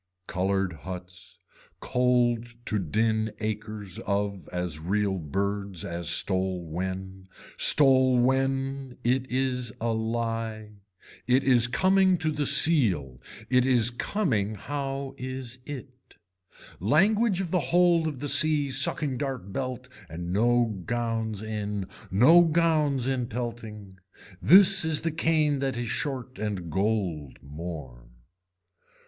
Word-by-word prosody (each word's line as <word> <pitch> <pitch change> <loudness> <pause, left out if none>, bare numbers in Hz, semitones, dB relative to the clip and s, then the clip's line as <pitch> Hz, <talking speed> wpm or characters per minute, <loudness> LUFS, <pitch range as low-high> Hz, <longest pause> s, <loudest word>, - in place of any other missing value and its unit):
Colored 95 0 -1
huts, 90 +2 -10 0.4
cold 120 -2 +1 0.2
to 105 -3 -1
din 110 +5 -1
acres 105 -2 -5
of 100 -3 -3
as 90 -3 -3
real 95 +3 -1
birds 100 +3 -3
as 85 -1 -3
stole 95 -2 +1
when. 95 +3 -6 0.3
Stole 130 -3 +4
when, 135 +1 -1
it 130 +2 0
is 125 -2 -1
a 115 - -2
lie. 110 -1 -3 0.6
It 130 +2 +3
is 125 -3 +5
coming 190 +6 +3
to 160 -1 -1
the 150 -1 -1
seal, 110 - +3 0.3
it 125 0 +3
is 125 -2 +3
coming 120 - -1
how 135 +3 -5
is 130 -1 -5
it. 130 -3 -10 0.6
Language 195 - +2
of 180 -4 -4
the 180 - +2
hold 175 -2 +3
of 140 -4 -6
the 145 - -3
sea 150 -1 +3
sucking 135 0 +1
dart 130 -9 -5
belt 130 0 -4 0.2
and 85 +2 -6
no 115 -1 +1
gowns 115 -2 -3
in, 105 -2 -4 0.2
no 130 - +6
gowns 155 -5 +1
in 130 -2 -1
pelting. 110 -5 -7 0.4
This 195 - +7
is 160 -2 +2
the 165 - -2
cane 155 -2 +1
that 135 -3 -2
is 120 -2 -4
short 130 -3 -4
and 100 -6 -4
gold 95 - -2
more. 70 -5 -9
120 Hz, 120 wpm, -26 LUFS, 100-135 Hz, 0.6 s, This